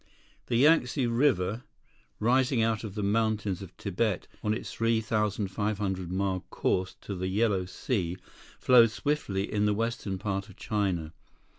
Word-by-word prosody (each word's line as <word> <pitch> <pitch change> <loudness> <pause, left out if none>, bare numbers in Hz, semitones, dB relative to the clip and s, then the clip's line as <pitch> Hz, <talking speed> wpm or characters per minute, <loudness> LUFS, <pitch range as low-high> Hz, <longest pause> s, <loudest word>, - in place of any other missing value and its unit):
The 120 - 0
Yangtze 135 -1 +4
River, 115 -3 +1 0.6
rising 125 +1 +3
out 115 -1 0
of 105 -3 -6
the 105 - -2
mountains 105 -2 0
of 95 - -10
Tibet 100 0 -1 0.2
on 105 - +1
its 110 - -3
3,500 105 -4 -1
mile 95 0 0
course 95 0 -1
to 100 - -6
the 95 0 -3
Yellow 100 -1 +1
Sea, 90 -3 -2 0.4
flows 120 -3 +6
swiftly 110 -10 -1
in 105 0 +2
the 105 - +2
western 115 -3 -2
part 100 +1 -3
of 95 - -13
China. 95 -7 -1
105 Hz, 140 wpm, -29 LUFS, 95-115 Hz, 0.6 s, flows